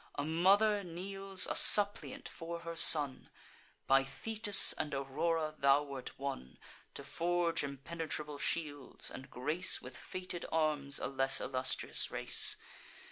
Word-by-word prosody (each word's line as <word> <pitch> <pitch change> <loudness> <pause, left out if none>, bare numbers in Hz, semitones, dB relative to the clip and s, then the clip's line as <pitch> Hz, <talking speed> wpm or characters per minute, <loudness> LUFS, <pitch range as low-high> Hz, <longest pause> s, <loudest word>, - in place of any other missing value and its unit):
A 145 - -4
mother 200 +6 +2
kneels 195 +2 -2
a - - -2
suppliant 205 -1 +5
for 170 0 -9
her 165 0 -8
son. 145 -4 +5 0.6
By 135 0 +3
Thetis 210 +7 +3
and 150 -2 -5
Aurora 155 +4 -3
thou 140 0 +2
wert 140 -3 -9
won 135 - -7 0.4
To - - -8
forge 175 -1 -2
impenetrable 150 +1 -7
shields, 145 -5 -4
and 130 - -11
grace 155 +9 -1
With 125 0 -12
fated 180 +2 -8
arms 150 -3 0
a - - -4
less 135 0 +1
illustrious 130 0 0
race. - - +1
155 Hz, 130 wpm, -32 LUFS, 140-175 Hz, 0.6 s, suppliant